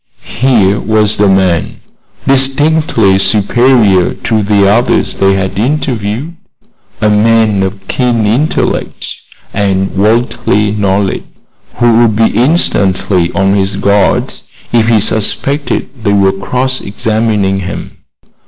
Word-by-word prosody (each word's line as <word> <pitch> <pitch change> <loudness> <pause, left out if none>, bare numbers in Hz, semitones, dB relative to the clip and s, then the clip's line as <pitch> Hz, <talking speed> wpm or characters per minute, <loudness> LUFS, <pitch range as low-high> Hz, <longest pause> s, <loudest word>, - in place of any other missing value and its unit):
Here 110 -6 +1
was 110 -1 +1
a 105 - +3
man 95 -3 0 0.5
distinctly 135 -6 +2
superior 105 -2 +2
to 110 -1 -1
the 100 -1 +2
others 115 +5 +1
they 95 0 +1
had 95 0 -3
interviewed, 130 +2 -2 0.6
a 110 - +1
man 110 -1 +2
of 95 0 -4
keen 120 -4 0
intellect 125 +9 -1 0.4
and 95 -2 -1
worldly 105 0 0
knowledge, 100 -1 -1 0.5
who 120 -1 +3
would 115 -3 +2
be 110 +1 +2
instantly 100 - +1
on 95 -1 +1
his 100 0 0
guard 100 -1 +1 0.4
if 115 -1 +2
he 115 -2 +3
suspected 135 +7 -2 0.2
they 100 -2 +1
were 100 -1 +3
cross 125 +7 -3
examining 105 -2 -1
him. 95 +1 -7
105 Hz, 115 wpm, -11 LUFS, 95-120 Hz, 0.6 s, a